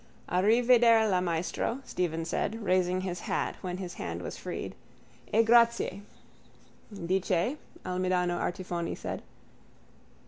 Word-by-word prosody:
_ -, -, -8 dB
—Arrivederla, 225 Hz, 0 st, +5 dB
maestro, 175 Hz, +8 st, -1 dB
Stephen 165 Hz, -2 st, -2 dB
said, 220 Hz, +6 st, -2 dB
raising 185 Hz, -1 st, +2 dB
his 180 Hz, -2 st, -3 dB
hat -, -, -2 dB
when 180 Hz, -1 st, -4 dB
his 180 Hz, -2 st, -6 dB
hand 85 Hz, +1 st, -5 dB
was -, -, -5 dB
freed. -, -, -5 dB, 0.6 s
E 225 Hz, +2 st, +5 dB
grazie. 235 Hz, -4 st, +4 dB, 1.0 s
—Di 185 Hz, +3 st, +2 dB
che? 185 Hz, -, 0 dB, 0.3 s
Almidano 180 Hz, -1 st, 0 dB
Artifoni 175 Hz, -2 st, -3 dB
said. -, -, -5 dB
185 Hz, 115 wpm, -29 LUFS, 175-220 Hz, 1.0 s, Arrivederla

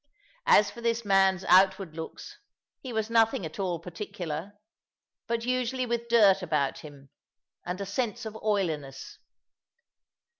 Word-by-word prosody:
As 205 Hz, -, +5 dB
for 235 Hz, -, -11 dB
this 230 Hz, -1 st, -1 dB
man's 195 Hz, -2 st, +3 dB
outward 190 Hz, -2 st, +4 dB
looks, 160 Hz, -1 st, -8 dB, 0.4 s
he 260 Hz, -, -8 dB
was 220 Hz, 0 st, -2 dB
nothing 225 Hz, -5 st, +3 dB
at 160 Hz, +5 st, -8 dB
all 180 Hz, -3 st, -1 dB
particular, 170 Hz, 0 st, -6 dB, 0.7 s
but 230 Hz, 0 st, -2 dB
usually 255 Hz, 0 st, -1 dB
with 235 Hz, -1 st, -2 dB
dirt 205 Hz, -5 st, +5 dB
about 150 Hz, -6 st, -1 dB
him, 140 Hz, -3 st, -13 dB, 0.6 s
and 180 Hz, +2 st, -3 dB
a 200 Hz, -, -3 dB
sense 235 Hz, +3 st, -3 dB
of 220 Hz, 0 st, -6 dB
oiliness. 165 Hz, -11 st, -3 dB
195 Hz, 135 wpm, -28 LUFS, 170-230 Hz, 0.7 s, As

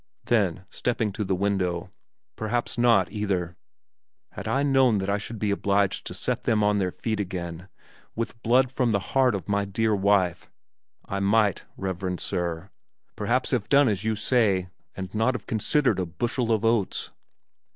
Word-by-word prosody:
Then, 95 Hz, -5 st, +1 dB
stepping 115 Hz, -3 st, -1 dB
to 105 Hz, +2 st, -3 dB
the 95 Hz, -1 st, 0 dB
window, 90 Hz, -3 st, -1 dB, 0.4 s
"Perhaps 120 Hz, +2 st, -2 dB
not, 120 Hz, -7 st, +3 dB
either! 95 Hz, -5 st, -2 dB, 0.8 s
Had -, -, -7 dB
I 135 Hz, +1 st, +1 dB
known 135 Hz, -5 st, +4 dB
that 95 Hz, 0 st, -1 dB
I 100 Hz, -, +1 dB
should 110 Hz, +2 st, -5 dB
be 105 Hz, -1 st, 0 dB
obliged 100 Hz, -1 st, +1 dB
to -, -, -6 dB
set -, -, -2 dB
them 105 Hz, -1 st, +2 dB
on 105 Hz, 0 st, +3 dB
their 95 Hz, -2 st, +1 dB
feet 110 Hz, +3 st, -3 dB
again 90 Hz, -2 st, -5 dB, 0.5 s
with 115 Hz, 0 st, -4 dB
blood 125 Hz, +2 st, +3 dB
from 130 Hz, -2 st, +1 dB
the 105 Hz, -, +3 dB, 0.2 s
heart 130 Hz, -4 st, +4 dB
of 95 Hz, -5 st, -6 dB
my 100 Hz, 0 st, +1 dB
dear 105 Hz, +2 st, 0 dB
wife, 95 Hz, -3 st, +1 dB, 0.6 s
I 100 Hz, -, -3 dB
might, 100 Hz, 0 st, +2 dB
reverend 95 Hz, -1 st, -3 dB
Sir, 90 Hz, 0 st, -3 dB, 0.4 s
perhaps 120 Hz, +5 st, 0 dB
have 120 Hz, -6 st, -1 dB
done 140 Hz, -1 st, +5 dB
as 100 Hz, -3 st, 0 dB
you 110 Hz, 0 st, 0 dB
say 105 Hz, -5 st, +2 dB, 0.3 s
and 95 Hz, -1 st, -6 dB
not 115 Hz, +4 st, +1 dB
have 110 Hz, -, -6 dB
considered 125 Hz, +3 st, +1 dB
a 90 Hz, -, -1 dB
bushel 120 Hz, +6 st, -1 dB
of 110 Hz, 0 st, +1 dB
oats! 115 Hz, -4 st, 0 dB
105 Hz, 170 wpm, -26 LUFS, 95-115 Hz, 0.8 s, done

